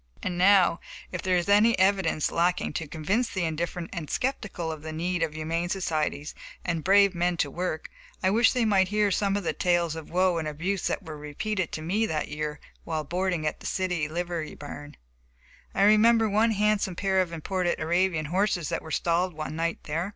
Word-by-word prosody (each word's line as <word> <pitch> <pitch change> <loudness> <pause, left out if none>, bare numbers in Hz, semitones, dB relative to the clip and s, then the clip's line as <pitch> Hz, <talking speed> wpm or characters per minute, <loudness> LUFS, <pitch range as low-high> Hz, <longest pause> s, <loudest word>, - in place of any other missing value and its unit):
And 180 - -2
now, 185 -1 +5 0.3
if 185 - -4
there 185 -1 +2
is 175 - -1
any 210 +3 +5
evidence 190 -5 +2
lacking 175 +2 +1
to 165 - -3
convince 195 - -1
the 190 - -2
indifferent 170 +2 -3
and 165 -5 -5
skeptical 215 -10 -2
of 155 -2 -7
the 160 +1 -6
need 175 +2 -2
of 160 -2 -1
humane 165 +2 -2
societies 155 -5 -2 0.3
and 165 -3 -1
brave 200 0 +5
men 175 0 0
to 145 -3 0
work, 175 0 -3 0.4
I 190 - +3
wish 225 +3 +4
they 245 -2 +1
might 195 -3 +3
hear 210 0 +1
some 200 +1 +1
of 205 - -3
the - - -1
tales 175 -3 +1
of 160 -1 -8
woe 180 -1 +2
and 155 - -3
abuse 170 +6 -2
that - - -2
were 160 -3 -8
repeated 175 +5 -3
to 155 - -4
me 210 +7 +1
that 155 -4 -2
year 150 0 -4 0.2
while 160 -2 -2
boarding 175 +1 -1
at 150 - -2
a - - -11
city 180 -5 -1
livery 170 0 -4
barn. 145 0 -9 0.8
I 195 - +3
remember 220 +2 +5
one 215 +3 +3
handsome 210 -3 +1
pair 190 0 +2
of 180 -2 -2
imported 175 +2 -1
Arabian 170 0 +1
horses 180 -1 0
that - - -2
were 160 - -10
stalled 170 +2 0
one 155 0 -5
night 165 +1 -2
there. 165 +5 -2
175 Hz, 200 wpm, -27 LUFS, 160-195 Hz, 0.8 s, now